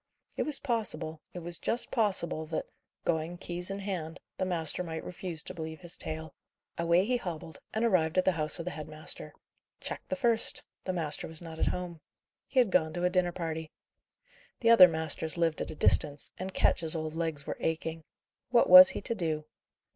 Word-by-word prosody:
It - - -1
was 300 -2 -2
possible, 170 - -2
it 175 - -8
was 175 0 -5
just 235 - -2
possible 185 -8 +1
that, 160 - -3 0.4
going, 165 +1 -1
keys 175 +1 -3
in 195 - -3
hand, 185 -5 -4 0.2
the 185 - +1
master 170 -2 -1
might 160 -2 -5
refuse 175 -3 -3
to - - -7
believe 160 -1 -6
his 175 -1 -5
tale. 160 0 -6 0.4
Away 170 +2 +3
he 250 +2 +1
hobbled, 165 -7 -7
and 220 +2 0
arrived 180 -6 +2
at 185 - +4
the 190 - +5
house 155 -3 -1
of 170 - -6
the 180 - -3
head 155 -3 -7
master. 155 0 -4 0.5
Check - - -4
the 280 - 0
first! 240 -5 +1 0.2
The 185 - 0
master 160 -4 -2
was 160 -1 -6
not 165 -2 -9
at - - +1
home. 175 -3 -3 0.5
He - - -8
had 240 -6 +5
gone 160 -4 +2
to 175 - -3
a 180 - +2
dinner 180 -1 +2
party. 160 -2 -4 0.9
The 230 -1 +5
other 190 -6 +10
masters 160 0 +1
lived 165 -2 +1
at - - -3
a - - -6
distance, 145 -1 +3
and 190 +1 -4
Ketch's 165 -3 +1
old 155 -1 -3
legs 160 -4 -3
were - - -4
aching. 160 0 -2 0.5
What 240 -1 +4
was 185 +1 +11
he - - -4
to 230 - 0
do? 160 -7 -2
170 Hz, 200 wpm, -30 LUFS, 160-185 Hz, 0.9 s, was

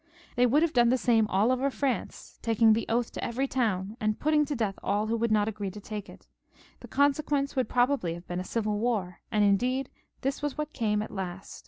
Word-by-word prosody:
They 250 0 +4
would 285 +6 +3
then 335 - +4
have 315 - -14
done 240 -1 +5
the 255 - +3
same 230 -4 +3
all 205 +5 +2
over 260 +2 +1
France, 275 -1 -3
taking 225 -1 +4
the 225 - -1
oath 235 +1 0
to - - -6
every 260 +4 -1
town 215 -5 -1
and 215 0 0
putting 300 0 +3
to 290 - -3
death 215 -5 -2
aU 205 +1 +1
who 225 +1 0
would 230 0 0
not 210 -1 +3
agree 205 -2 -3
to 205 +3 -9
take 205 0 -7
it. - - -14 0.5
The - - -11
consequence 285 0 +1
would 260 -2 0
probably 245 -9 +1
have 175 +1 -11
been 175 0 -4
a - - -3
civil 210 +1 -1
war, 210 -7 -1
and 210 -2 +3
indeed 250 +7 +1 0.3
this 270 +2 -2
was 290 -1 -3
what 300 0 -4
came 210 -3 0
at - - -8
last? 190 -1 -6
230 Hz, 230 wpm, -28 LUFS, 210-265 Hz, 0.5 s, done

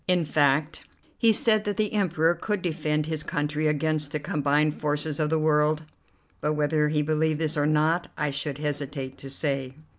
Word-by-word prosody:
In 180 -3 +2
fact, 145 +1 +1 0.4
he 230 - +5
said 215 0 +2
that 205 -2 -2
the 215 -1 0
Emperor 175 -5 +2
could 195 +3 -3
defend 155 -3 -1
his 160 -1 -2
country 150 -1 -1
against 150 -1 0
the 150 - -2
combined 150 0 0
forces 150 0 0
of 150 -1 +1
the 160 - +2
world; 155 0 +2 0.6
but 150 - 0
whether 150 0 +1
he 150 0 +1
believed 155 0 0
this 160 -1 0
or 145 -1 +1
not, 155 +3 +2
I 150 -1 -1
should 140 0 -2
hesitate 145 -2 -4
to 135 - -7
say. 135 -2 -2
150 Hz, 180 wpm, -26 LUFS, 150-160 Hz, 0.6 s, he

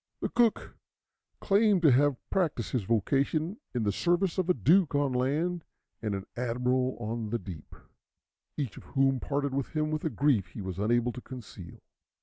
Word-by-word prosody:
The - - -2
cook 235 -2 +1 0.6
claimed 200 -2 +3
to 155 - +7
have 140 +1 +3
practised 160 - 0
his 120 -7 -1
vocation 140 - 0 0.2
in 120 - 0
the 100 - +1
service 175 - +1
of 185 -1 0
a - - +6
duke 160 - +3
on 145 -2 +1
land, 155 +7 0 0.4
and 105 -3 -2
an 95 0 -5
admiral 125 +1 0
on 115 -1 -3
the 120 - 0
deep, 90 -7 -10 0.8
each 135 -8 -3
of - - -10
whom 135 -2 +1
parted 140 +1 -1
from 135 +1 0
him 155 -1 -2
with 155 0 -2
a 160 - 0
grief 130 -7 +2
he 95 - -8
was 95 0 -5
unable 120 +3 +2
to 125 - -8
conceal. 110 -10 -10
135 Hz, 175 wpm, -29 LUFS, 115-155 Hz, 0.8 s, to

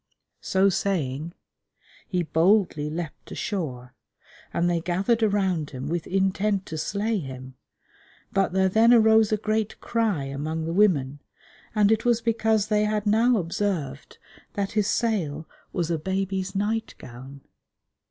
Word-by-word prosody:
So 190 +1 +2
saying, 170 -5 -2 0.7
he 180 -3 -1
boldly 165 -2 +2
leapt 160 0 -6
ashore, 130 - -4 0.6
and 175 - +1
they 170 -1 +1
gathered 190 +7 0
around 190 -7 +1
him 130 +1 -6
with 170 0 -2
intent 195 +1 0
to 160 - -6
slay 210 +5 -1
him, 130 -3 -8 0.8
but 195 -1 +2
there 190 +1 +2
then 225 +5 +5
arose 220 -1 +5
a 215 - +2
great 215 0 -2
cry 220 -10 0
among 150 +4 -3
the 165 - -3
women, 145 -9 +2 0.6
and 210 0 +4
it 220 - +2
was 240 -2 +3
because 220 -2 +1
they 210 -1 +1
had 210 0 -1
now 225 +3 +4
observed 165 -6 -3 0.4
that 200 -1 -2
his 210 -2 +1
sail 165 -12 -1 0.2
was 175 -2 -2
a 165 - 0
baby's 190 +2 -2
night 215 +3 -1
gown. 130 +3 -11
190 Hz, 140 wpm, -25 LUFS, 160-215 Hz, 0.8 s, then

